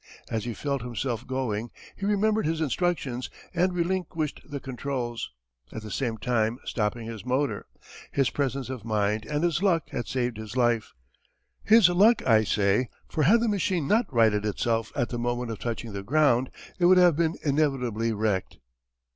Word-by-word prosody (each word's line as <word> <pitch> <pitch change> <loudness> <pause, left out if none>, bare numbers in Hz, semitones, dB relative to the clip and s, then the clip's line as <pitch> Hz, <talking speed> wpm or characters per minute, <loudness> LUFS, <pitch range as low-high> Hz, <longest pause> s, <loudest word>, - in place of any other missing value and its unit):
As 110 -1 -2
he 120 -2 -4
felt 140 -2 -2
himself 120 -1 -3
going 120 -4 -2 0.3
he 200 - -3
remembered 210 -1 +2
his 160 0 -1
instructions 150 -5 -1 0.2
and 180 +1 +2
relinquished 175 -3 -2
the 145 -2 -6
controls, 125 -2 -4 0.4
at 110 - -7
the 105 - -8
same 115 0 -2
time 115 0 0
stopping 110 +1 -2
his 115 -2 -7
motor. 130 +3 -1 0.4
His 135 -2 +1
presence 135 -2 -2
of 125 -5 -6
mind 105 -1 0
and 150 +1 -1
his 170 0 +1
luck 175 -5 +1
had 120 - -3
saved 125 -3 -1
his 110 +2 -7
life 120 -2 +1 0.7
his 220 -3 +7
luck 205 +6 +4
I 110 -2 +5
say, 105 +5 +2 0.2
for 155 - -2
had 225 +8 +5
the 235 - +1
machine 185 -7 0
not 220 +1 +2
righted 110 -4 +3
itself 115 +1 -1
at 120 - 0
the 120 - -4
moment 120 0 -2
of 110 - -6
touching 115 -2 -4
the 100 - -4
ground 130 +1 +2 0.3
it 175 - +3
would 185 +1 +7
have 175 -3 +6
been 165 +1 +1
inevitably 130 -6 +1
wrecked. 105 -3 -1
125 Hz, 170 wpm, -27 LUFS, 115-160 Hz, 0.7 s, his